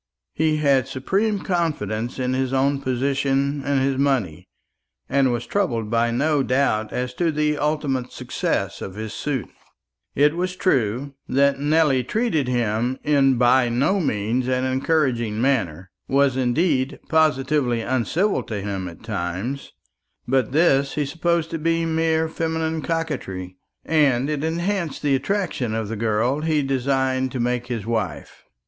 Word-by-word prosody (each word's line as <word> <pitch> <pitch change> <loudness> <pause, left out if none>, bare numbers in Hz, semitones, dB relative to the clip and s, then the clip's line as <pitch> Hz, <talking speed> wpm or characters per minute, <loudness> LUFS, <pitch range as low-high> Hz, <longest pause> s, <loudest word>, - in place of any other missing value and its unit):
He 155 0 +1
had 140 -4 +2
supreme 200 +11 0
confidence 120 - -2
in 130 -1 -1
his 130 0 -1
own 135 +1 +1
position 135 +2 0
and 140 -1 +1
his 135 0 0
money, 130 - 0 0.6
and 135 -1 +2
was 120 -1 -2
troubled 115 - -1
by 115 0 +2
no 145 +5 +1
doubt 125 -5 +1
as 125 0 -3
to 165 +4 0
the 150 -1 0
ultimate 145 -4 -1
success - - -2
of 95 - -6
his 110 +1 -5
suit. 140 -5 -3 0.7
It 145 +3 +4
was 180 +1 -2
true 135 - 0 0.2
that 140 +1 +3
Nelly 145 -3 +3
treated 165 - 0
him 120 +1 0
in 135 -3 +3
by 125 0 +4
no 140 +12 +1
means 120 - 0
an 130 0 0
encouraging 130 -5 0
manner 95 - 0 0.2
was, 140 -1 +3
indeed, 130 +2 +1
positively 140 -5 +2
uncivil 130 - 0
to 105 -3 -5
him 95 -2 -4
at 85 +3 -11
times; 105 +5 -4 0.6
but 130 -2 +1
this 140 -3 +3
he 150 0 0
supposed 165 +3 -1
to 165 - -3
be 165 +1 +1
mere 160 0 +1
feminine 160 0 -2
coquetry; 130 - -3 0.3
and 140 -3 +2
it 150 -1 -2
enhanced 170 0 -2
the 145 -2 +2
attractions 135 - -1
of 110 -2 -3
the 115 - -3
girl 115 +6 0
he 155 -2 +1
designed 130 -1 0
to 130 - -3
make 125 0 -1
his 115 -5 -4
wife. 110 -5 -4
135 Hz, 145 wpm, -22 LUFS, 120-155 Hz, 0.7 s, It